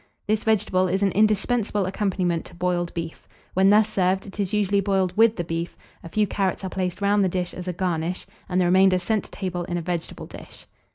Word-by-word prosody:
This 215 +1 0
vegetable 200 -4 +2
is 190 +2 0
an 195 - +3
indispensable 210 0 +1
accompaniment 185 -3 -1
to 180 - -13
boiled 175 -1 -1
beef. 165 -1 -6 0.3
When 190 +1 +4
thus 210 +1 +5
served, 190 -2 0
it 200 +1 -11
is 195 -3 -1
usually 205 -1 +2
boiled 190 -2 0
with 225 +1 +5
the 175 - -2
beef; 165 +1 -4 0.3
a 165 - -8
few 210 +4 +2
carrots 195 -2 -1
are 190 - -4
placed 185 0 -3
round 200 0 +3
the 190 - +2
dish 180 0 -3
as 180 0 -7
a 180 - -1
garnish, 175 0 -2 0.2
and 180 0 +1
the 180 - +3
remainder 185 +1 +5
sent 205 +3 -1
to - - -13
table 180 -3 -4
in 175 0 -3
a - - -2
vegetable 175 -1 -4
dish. - - -12
190 Hz, 220 wpm, -24 LUFS, 180-205 Hz, 0.3 s, thus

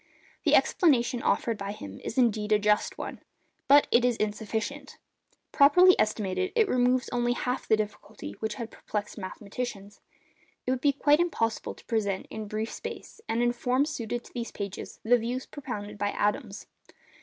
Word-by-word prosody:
The - - +5
explanation 250 -7 +3
offered 230 -3 0
by 200 0 -4
him 100 - -9
is 235 - -5
indeed 215 -4 +2
a 210 - +6
just 210 0 +1
one. - - -6 0.5
But 285 +1 +7
it 235 - +5
is 245 -2 +2
insufficient. 220 +6 -3 0.5
Properly 360 +6 +7
estimated 215 - 0
it 450 -3 +4
removes 250 -2 +2
only 240 0 +1
half 250 +1 -3
the 220 - +4
difficulty 210 - -5
which 220 -1 -3
had 230 -1 -6
perplexed 210 +1 -5
mathematicians. 205 +1 -6 0.6
It 255 - 0
would 260 -1 -1
be 285 - +4
quite 290 +2 +3
impossible 230 -10 -1
to - - -18
present 200 -4 -1
in 215 -1 -5
brief 215 +2 -3
space, - - -8
and 230 +2 +1
in 240 - +3
form 250 +3 +1
suited 240 -5 -4
to - - -17
these 235 -1 -4
pages, 200 -1 -6
the 245 +2 +4
views 245 +3 -3
propounded 210 -7 -7
by 205 - +1
Adams. 210 0 -2
230 Hz, 165 wpm, -28 LUFS, 210-255 Hz, 0.6 s, But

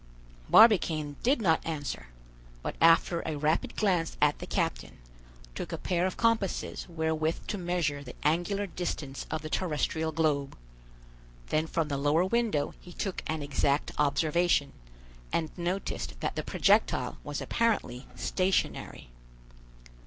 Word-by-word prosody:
Barbicane 160 -9 +5
did 255 -1 +2
not 160 -4 +3
answer, 145 - -4 0.6
but - - -3
after 165 +1 +5
a 155 -2 -3
rapid 155 +3 0
glance 180 -6 +1
at 150 0 +3
the - - -7
captain, - - -2 0.6
took - - -5
a - - -3
pair 180 0 0
of 185 - -5
compasses 230 -4 0
wherewith 160 -1 -1
to 205 - -3
measure 170 -5 -1
the 125 - -10
angular 175 +6 +1
distance 160 -6 -5
of 160 -1 -3
the 155 - -5
terrestrial 160 -2 -1
globe; 150 -3 0 0.9
then 155 +1 +1
from 160 -1 -1
the 140 -2 -2
lower 150 +5 +3
window 215 -8 0
he 175 - -12
took 195 +1 -3
an 155 -1 -2
exact 140 0 0
observation, 150 +1 +2 0.6
and 160 -2 -1
noticed 180 +2 -3
that - - -2
the - - -1
projectile - - +2
was - - -4
apparently 205 - -1
stationary. 185 - -1
160 Hz, 135 wpm, -29 LUFS, 150-180 Hz, 0.9 s, Barbicane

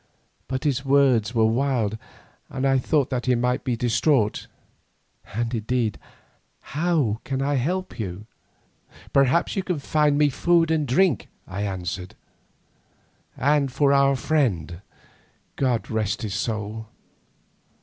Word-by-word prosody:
But 130 0 -3
his 135 -3 0
words 130 -5 +3
were 110 -1 +4
wild 115 -2 +1 0.5
and 135 0 -3
I 135 -1 +3
thought 140 +1 +1
that 125 -1 -2
he 125 - +4
might 125 +1 0
be 125 -3 -1
distraught. 120 -1 +1 0.9
And 115 +1 -1
indeed 115 -1 -1 0.7
how 150 -8 +1
can 135 -1 -3
I 140 +1 0
help 175 +8 -2
you?" 100 0 -5 0.9
"Perhaps 140 +4 +3
you 195 - 0
can 180 -3 -2
find 150 0 +1
me 150 0 +4
food 165 +3 +2
and 155 -3 +1
drink," 145 - +2 0.2
I 95 +2 -5
answered, 90 -2 -4 1.2
"and 140 -1 +2
for 140 +1 +3
our 140 0 +4
friend, 105 - -1 0.7
God 125 -4 0
rest 110 0 -1
his 105 -3 -3
soul. 110 0 -3
130 Hz, 130 wpm, -24 LUFS, 110-145 Hz, 1.2 s, were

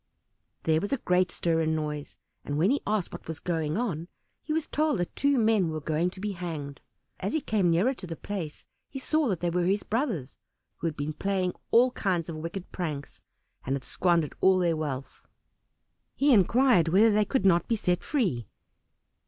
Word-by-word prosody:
There 160 0 +2
was 205 - -3
a 275 - +2
great 180 -4 +2
stir 165 -1 0
and 160 0 +1
noise, 150 -2 -4 0.3
and, 145 - -3
when 180 +9 +3
he 285 - +1
asked 210 -3 0
what - - -9
was 160 -1 -5
going 160 -2 -1
on, 175 -9 -2 0.3
he - - -6
was 320 0 0
told 305 -4 +1
that 175 - -3
two 280 -1 +2
men 220 -6 +3
were 155 0 -3
going 155 +3 0
to 185 - -11
be 210 +1 -2
hanged. 160 -7 -6 0.4
As 195 - -2
he 315 - +2
came 210 - +1
nearer 185 +11 +3
to 200 -8 -9
the 165 - -5
place 170 -5 -6 0.3
he 270 - -7
saw 310 +2 +1
that 190 -7 -1
they 175 -1 0
were 175 0 +1
his 200 +3 +1
brothers, 215 - -2 0.4
who 170 - -2
had 160 - -4
been 145 +2 -3
playing 185 +1 -1 0.2
all 250 +2 +5
kinds 180 -7 -1
of 160 - -5
wicked 170 +4 -6
pranks, 150 -6 -5 0.4
and 135 - -1
had 135 - -5
squandered 170 -2 +1
all 190 0 +5
their 175 -3 +2
wealth. 140 -4 -5 0.9
He 280 0 +4
inquired 230 -2 +4
whether 205 +7 +5
they 210 0 +3
could 205 -2 0
not 175 -2 +4
be 230 - +2
set 180 -4 0
free. 185 - 0
180 Hz, 200 wpm, -28 LUFS, 160-215 Hz, 0.9 s, all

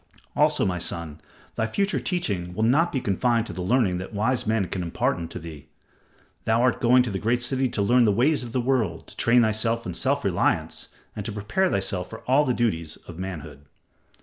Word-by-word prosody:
Also, - - +3
my 90 -2 -1
son, 80 -2 -3 0.3
thy 110 - -1
future 200 - 0
teaching 100 - -2
must 130 +10 +3
be 135 - 0
not - - -12
confined 115 +3 +1
to - - -7
the 90 - -5
learning 95 -2 +2
that 95 +3 -7
wise 115 +3 0
men 110 -3 +1
can 90 +1 -4
impart 85 -1 0
unto 85 +1 -6
thee. 80 -4 -9 0.8
Thou 110 +1 +2
art 125 +1 +2
going 125 +1 +5
to 120 - -3
the 95 - -3
great 120 +4 +1
city 130 +1 0
to 105 - -1
learn 120 +3 +4
the 105 - +4
ways 135 +9 +2
of 120 -2 -7
the 125 - 0
world, 120 -9 0
to - - -11
train 120 +1 +4
thyself 115 +1 0
in 90 - -4
self - - 0
reliance, - - 0 0.3
and 105 - -4
to 110 - -3
prepare 105 - 0
thyself 95 - -2
for 110 - -9
all 135 +4 +3
the 125 - +1
duties 85 -9 -1
of 85 0 -9
manhood." 75 -6 -7
110 Hz, 210 wpm, -25 LUFS, 90-125 Hz, 0.8 s, going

